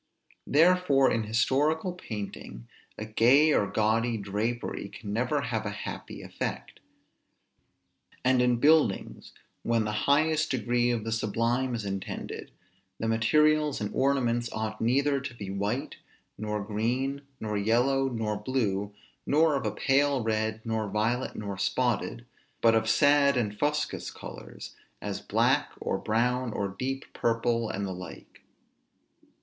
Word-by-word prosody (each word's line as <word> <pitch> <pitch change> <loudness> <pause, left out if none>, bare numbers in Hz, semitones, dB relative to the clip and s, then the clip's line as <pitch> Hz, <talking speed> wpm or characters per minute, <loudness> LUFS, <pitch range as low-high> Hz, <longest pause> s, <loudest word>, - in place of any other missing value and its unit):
Therefore 160 -4 +4
in 115 -1 0
historical 145 - +1
painting, 100 - -7 0.3
a 110 - -5
gay 130 +8 +4
or 100 - +2
gaudy 110 +3 +1
drapery 105 +1 -3
can 100 0 -7
never 125 +6 0
have 115 -5 -2
a 105 - -3 0.2
happy - - -7
effect: - - -5 1.5
and 130 -1 +4
in 125 0 +3
buildings, 145 -4 +2 0.3
when 115 -1 +1
the 105 - -1 0.2
highest 155 +2 +3
degree 120 0 +1
of 120 -3 -1
the 115 - -4
sublime 115 +3 0
is 110 -3 -4
intended, 95 -1 -5 0.5
the 115 - -1
materials 150 +6 +3
and 105 -1 -4
ornaments 120 -3 +1
ought 110 0 -4
neither 140 +4 +2
to 140 -3 -7
be 100 -4 -6
white, 100 +1 -2 0.4
nor 105 -1 -3
green, 125 +7 -1 0.2
nor 105 -1 -3
yellow, 125 +6 +2
nor 110 -3 -2
blue, 105 -4 -1 0.3
nor 155 +1 +4
of 135 - -1
a - - 0
pale 140 -1 +2
red, 110 0 -1
nor 110 -2 -1
violet, 115 +5 -1
nor 100 -3 -5
spotted, 120 -1 -1 0.3
but 115 -1 +5
of 110 0 +2
sad 140 +2 +4
and 105 -4 -2
fuscous 150 0 -1
colors, - - -10 0.2
as - - -4
black, - - +2
or - - -2
brown, 125 +2 0
or 100 -1 -2
deep 135 +7 -4
purple, 115 0 0
and 100 +1 -3
the 95 - -4
like. 90 0 -10
115 Hz, 135 wpm, -28 LUFS, 110-135 Hz, 1.5 s, but